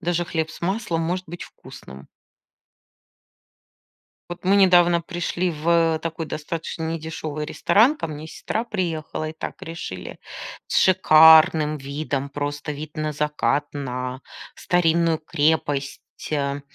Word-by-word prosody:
даже 175 0 -1
хлеб 160 -2 -2
с - - -12
маслом 190 -2 -1
может 180 +3 -2
быть 175 +2 -8
вкусным. 65 +1 -13 2.2
Вот 175 - -8
мы 190 +2 +4
недавно 175 -3 +5
пришли 175 +1 -2
в, 165 +1 +2
э, - - -4
такой 165 0 -4
достаточно 160 +1 -5
недешёвый 160 -2 -4
ресторан. 225 - +3
Ко 290 - -4
мне 155 +1 -8
сестра 220 +7 -3
приехала, 165 -7 -3
и - - -9
так 160 - -7
решили, 165 - -7 0.5
с - - -1
шикарным 160 -3 +6
видом, 140 0 -3
просто 145 +1 -4
вид 150 +2 -7
на 155 0 -1
закат, 150 0 0
на 130 -2 -4 0.3
старинную 165 -2 +2
крепость, 150 -3 0 0.3
э. 140 -1 -1
160 Hz, 125 wpm, -23 LUFS, 150-170 Hz, 2.2 s, шикарным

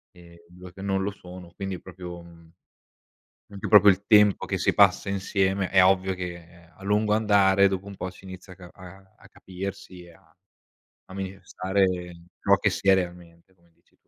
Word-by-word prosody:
Ehm, 85 -1 -17
2 90 0 -14
che 95 - -12
non 95 -1 -1
lo 100 - -2
sono, 90 -2 -13
quindi 95 -2 -5
proprio, 90 -1 -10
mhmm, 85 -1 -18 1.0
anche 100 -1 -6
proprio 105 -1 +7
il 95 +1 -1
tempo 105 -2 +4
che - - -2
si - - +1
passa - - +3
insieme, 95 -1 -1
è 95 -1 +5
ovvio 95 0 +2
che, 90 -1 -6
ehm, 85 0 -19
a - - -17
lungo 105 +1 +1
andare 100 -2 +3
dopo 95 0 -5
un 100 -1 -10
po' 90 - -5
si 90 - -18
inizia 95 0 -11
a - - -14
ca 90 -1 -13
a 95 +1 -15
a - - -19
capirsi 95 -1 -9
e 85 - -16
a - - -25 0.7
a - - -14
manifestare 95 0 -2 0.5
ciò 100 - +3
che 105 +1 +1
si 95 - -5
è 95 - +7
realmente 85 -1 -5
come 85 -2 -31
dici - - -37
tu. - - -48
95 Hz, 195 wpm, -25 LUFS, 90-100 Hz, 1.0 s, proprio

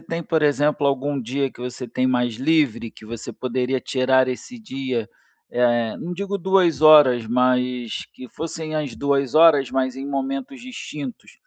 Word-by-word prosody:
tem, 165 0 -5
por 160 0 0
exemplo, 145 0 +2
algum 140 +1 -1
dia 135 +3 -2
que - - -15
você 125 0 -6
tem 130 - 0
mais 125 -2 0
livre, 135 -5 +1
que - - -15
você 115 +1 -7
poderia 130 +1 -2
tirar 130 0 +2
esse 240 - -6
dia, 130 - -4 0.4
eh, 120 -2 +1
não 175 - -5
digo 200 +2 -3
2 180 -5 +2
horas, 145 -7 +7
mas 125 0 0
que 130 -1 -11
fossem 160 -1 -6
as 145 -6 -3
2 140 -1 0
horas, 155 -5 +6
mas 130 -1 -1
em 135 +1 -6
momentos 135 - -4
distintos, 150 - -8
135 Hz, 160 wpm, -22 LUFS, 125-155 Hz, 0.4 s, horas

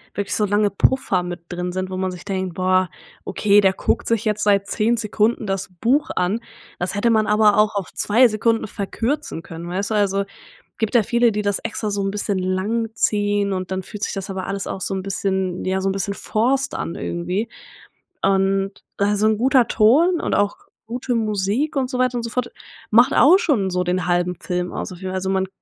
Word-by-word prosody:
wirklich 200 -1 -2
so 210 - +2
lange 205 +1 +2
Puffer 195 -3 +1
mit 175 -1 -6
drin 180 0 -3
sind, 185 0 -3
wo 185 - -4
man 185 0 -1
sich 180 -1 -9
denkt: 190 -3 -3
„Boah, 185 0 +2 0.4
okay, 205 -1 +3
der 190 -1 +3
guckt 235 - -1
sich 230 -2 +1
jetzt 210 0 0
seit 200 -1 +3
10 230 +2 +1
Sekunden 215 +1 0
das 195 0 -2
Buch 285 +7 +2
an. 185 +5 0 0.4
Das 175 +2 -2
hätte 205 +4 +2
man 220 -1 +2
aber 210 0 +4
auch 210 0 +3
auf 200 -2 -3
2 235 +5 +4
Sekunden 225 0 0
verkürzen 225 - -3
können“, 165 +1 -8
weißt 195 +4 -2
du? - - +1
Also, 200 -1 +1 0.5
gibt 220 +1 -2
ja 235 - +6
viele, 235 +2 +3
die 210 0 -1
das 200 -1 0
extra 215 -1 -3
so 200 0 -1
'n 195 - -1
bisschen 200 -1 -1
lang 195 +5 -1
ziehen, 205 -1 +1
und 185 0 -4
dann 190 0 -2
fühlt 210 +2 -8
sich - - -1
das 195 -1 -5
aber 190 -1 -4
alles 195 0 -3
auch 190 - -5
so 195 - -2
'n 190 - -3
bisschen 190 -2 -2
ja, 190 0 0
so 195 - 0
'n - - +1
bisschen 195 +1 -2
forced 260 +8 0
an, 165 - -4
irgendwie 180 +6 -3 0.7
und 195 0 +2 0.3
also 205 +1 +1
'n 220 -1 +2
guter 255 0 +4
Ton 305 +12 +4
und - - 0
auch 205 0 +1 0.3
gute 245 +1 -2
Musik 215 +7 0
und 260 -2 0
so 255 - -3
weiter 255 -1 +1
und 235 - -3
so 230 - -4
fort 250 -1 -2 0.4
macht 235 +3 +5
auch 325 +9 +7
schon 260 - +1
so 180 0 0
den 180 -1 -1
halben 175 0 +1
Film 180 -1 -3
aus - - -4
auf 180 - -10
jeden 190 - -5
Fall. 185 - -4
Also, 190 0 -2
man 190 0 0
200 Hz, 220 wpm, -21 LUFS, 190-225 Hz, 0.7 s, auch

